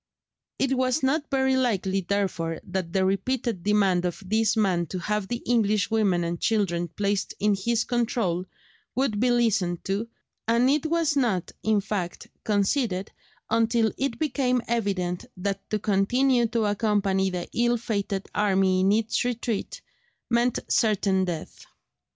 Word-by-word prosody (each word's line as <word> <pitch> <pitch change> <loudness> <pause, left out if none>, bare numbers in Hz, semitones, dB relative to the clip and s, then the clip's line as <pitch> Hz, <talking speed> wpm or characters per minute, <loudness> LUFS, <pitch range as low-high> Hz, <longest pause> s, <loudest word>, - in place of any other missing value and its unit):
It 270 0 +1
was 255 +2 +1
not 290 +3 +1
very 265 -1 +2
likely 195 -7 +1
therefore 180 -4 -1
that 185 -2 -4
the 190 0 +2
repeated 220 +1 -1
demand 195 -3 +2
of 180 +2 -3
this 220 +3 +1
man 180 -5 +1
to 185 - -5
have 210 +2 -2
the 240 +2 -4
English 215 -4 +2
women 200 -6 +2
and 170 0 -3
children 185 -6 +1
placed 200 +3 -2
in 210 0 +3
his 225 +3 0
control 225 -7 -1 0.5
would 250 -6 0
be 250 +2 +3
listened 215 -8 +1
to, 200 +4 -2 0.4
and 235 +2 +3
it 300 +2 +1
was 325 -2 +1
not, 225 -10 0
in 215 -2 +2
fact, 190 -3 -4
conceded 205 -1 0 0.4
until 225 0 +2
it 270 -3 -2
became 260 -5 0
evident 195 -6 -1
that 195 +1 -3
to 215 - 0
continue 235 +5 +2
to 225 -1 0
accompany 205 -2 +1
the 180 -1 -4
ill 240 0 +2
fated 200 -3 -3
army 195 -2 +2
in 190 +1 +3
its 220 +1 +1
retreat 240 -3 -3 0.5
meant 240 +1 +2
certain 195 -3 +2
death. 170 -3 -6
210 Hz, 145 wpm, -26 LUFS, 190-240 Hz, 0.5 s, in